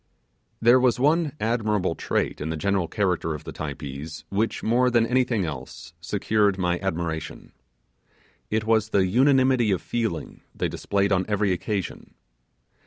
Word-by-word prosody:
There 120 +3 +6
was 125 -1 +2
one 150 +2 +2
admirable 110 -5 0
trait - - -2
in 75 - -3
the 80 - -2
general 100 +1 0
character 90 -6 -1
of 75 - -9
the - - -8
Typees 75 +1 -6
which, 105 +3 -1
more 125 +3 +3
than 120 -2 +3
anything 120 -5 +1
else, 80 +2 -8
secured 100 +3 +1
my 90 -2 0
admiration: 85 -4 -4 1.0
it 110 0 0
was 110 -1 +2
the 100 -3 +3
unanimity 130 +2 +3
of 95 -3 +1
feeling 115 -8 -3
they - - -1
displayed 100 0 -1
on 95 -2 +3
every 105 -2 +1
occasion. 95 +2 -4
100 Hz, 145 wpm, -25 LUFS, 85-115 Hz, 1.0 s, There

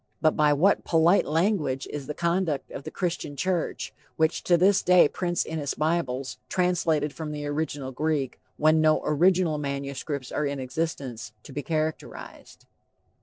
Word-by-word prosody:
But 155 -1 +3
by 150 -1 +4
what 170 +8 +3
polite 165 +3 +3
language 155 -5 0
is 145 -2 -6
the 150 - -4
conduct 170 -3 -1
of 135 - -8
the - - -4
Christian 175 -5 -3
church 175 +4 -2 0.2
which 160 +1 +1
to 175 - +4
this 190 +3 +4
day 180 -3 +6
prints 175 +2 -1
in 160 0 -4
its 145 -2 -2
bibles 150 -5 -1
"Translated 170 -5 +1
from 155 -1 -5
the 150 -1 -5
Original 145 -2 -3
Greek," 145 -1 -1 0.2
when 155 +1 +4
no 155 0 +3
original 170 0 +3
manuscripts 140 -1 -4
are 150 - 0
in 140 -1 -3
existence 130 -5 -4
to 135 - -11
be 145 - -3
characterized? 155 +1 -5
155 Hz, 160 wpm, -26 LUFS, 140-170 Hz, 0.2 s, day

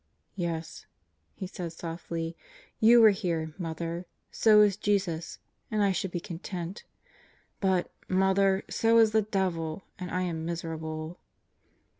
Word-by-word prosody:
"Yes," 170 -3 -4 0.5
he 190 - -5
said 175 -2 -6
softly, 165 0 -5 0.4
"you 230 +1 +7
are 220 - +9
here, 170 -6 -2
Mother. 170 +1 -4 0.2
So 215 -2 +6
is 205 -2 +4
Jesus. 195 -5 -1 0.3
And 215 -2 +1
I 200 - +3
should 190 +1 -1
be 175 - -3
content. 175 +1 -6 0.7
But, 190 -2 +1 0.2
Mother, 190 +1 +3
so 230 0 +3
is 225 -1 +6
the 220 0 +4
devil, 185 -5 -2 0.2
and 180 -1 -5
I 180 +2 -1
am 165 -3 -3
miserable." 160 0 -5
180 Hz, 130 wpm, -29 LUFS, 165-200 Hz, 0.7 s, are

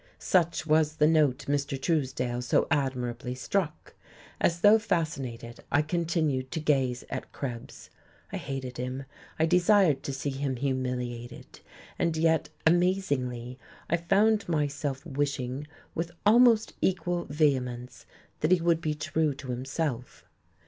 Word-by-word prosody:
Such 170 -3 +1
was 155 0 +3
the 150 - +3
note 150 -4 +3
Mr. 140 -1 -1
Truesdale 130 -5 -1
so 125 - +2
admirably 125 -3 -1
struck. 155 +4 -2 0.5
As 170 0 +1
though 210 +3 +7
fascinated, 135 - -3
I 145 - +3
continued 155 -5 -1
to 160 - -3
gaze 135 -5 +1
at - - -5
Krebs. 120 -4 -7 0.4
I - - -1
hated 130 -2 -5
him, 130 +2 -4 0.3
I 160 - +3
desired 180 -4 +4
to - - -4
see 135 +1 -3
him 135 0 -2
humiliated, 125 -2 -4 0.4
and 165 -2 +1
yet 160 0 +2 0.2
amazingly 140 -9 +1 0.3
I 170 - +4
found 200 +4 +2
myself 145 -2 -1
wishing 140 -2 -2 0.3
with 165 +1 -2 0.2
almost 225 0 +5
equal 175 -2 0
vehemence 130 -5 -1 0.3
that 155 - +1
he 185 - +5
would 165 -1 +2
be 155 -1 -1
true 155 -1 0
to 135 -1 -9
himself. 130 0 -3
145 Hz, 130 wpm, -28 LUFS, 130-165 Hz, 0.5 s, though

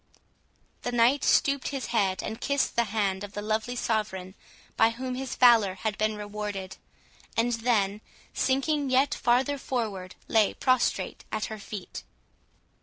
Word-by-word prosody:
The 245 - -3
knight 245 +4 +3
stooped 280 -1 +3
his 270 -4 -3
head, 190 -4 +1
and 220 - -5
kissed 280 -1 0
the 235 - +3
hand 200 -2 -1
of 205 0 -8
the 205 - -4
lovely 220 +3 -1
Sovereign 210 -6 -2 0.4
by 225 - +5
whom 255 +2 -4
his 260 0 -4
valour 225 -6 +5
had 210 +2 -2
been 215 0 +1
rewarded; 205 -2 -5 0.6
and 240 +1 +2
then, 215 -3 +1 0.3
sinking 275 +2 +1
yet 260 +2 +3
farther 260 +4 +1
forward, 205 -9 -3
lay 220 -2 +3
prostrate 255 -1 0
at 215 -1 -1
her 215 - -7
feet. 200 -2 -7
225 Hz, 145 wpm, -27 LUFS, 205-255 Hz, 0.6 s, by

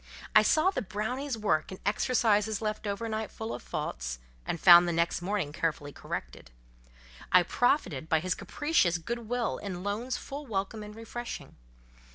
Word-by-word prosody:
I 215 - +10
saw 310 - +3
the 320 - -2
brownie's 240 +6 -3
work 200 -8 0
in 190 - -6
exercises 215 -1 +2
left 215 -1 -3
overnight 220 +1 -2
full 220 +1 -5
of - - -6
faults, 60 - -4 0.3
and 165 - -2
found 175 0 +9
next 170 0 +1
morning 185 -5 -2
carefully 150 -3 -2
corrected: - - -6 0.8
I 180 -1 +7
profited 175 - +1
by 160 - +4
his 185 +3 -1
capricious 295 - +1
good 230 +7 -5
will 245 -1 -1
in 185 -3 -5
loans 220 +6 -2
full 280 +1 -7
welcome 210 0 -2
and 210 0 -9
refreshing. 230 +1 -7
210 Hz, 155 wpm, -29 LUFS, 175-230 Hz, 0.8 s, I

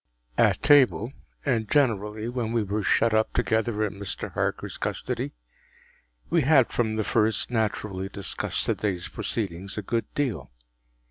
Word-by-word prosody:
At - - +3
table, 135 -4 +5 0.3
and 115 -6 0
generally 110 -6 +1
when 120 -2 -2
we 115 -2 +2
were 105 +2 -2
shut 115 +2 +3
up 110 0 +2
together 110 -2 +1
in 100 -2 -3
Mr. 100 - -5
Harker’s - - -2
custody, - - -3 1.0
we 170 - +4
had 140 -3 +4
from 110 -2 0
the 110 - 0
first 110 +2 +1
naturally 105 -4 -1
discussed 100 -1 -1
the - - +2
day’s 95 -4 -2
proceedings 95 -2 -4
a 105 - -3
good 115 +3 -2
deal. 115 - -1
110 Hz, 145 wpm, -26 LUFS, 100-120 Hz, 1.0 s, table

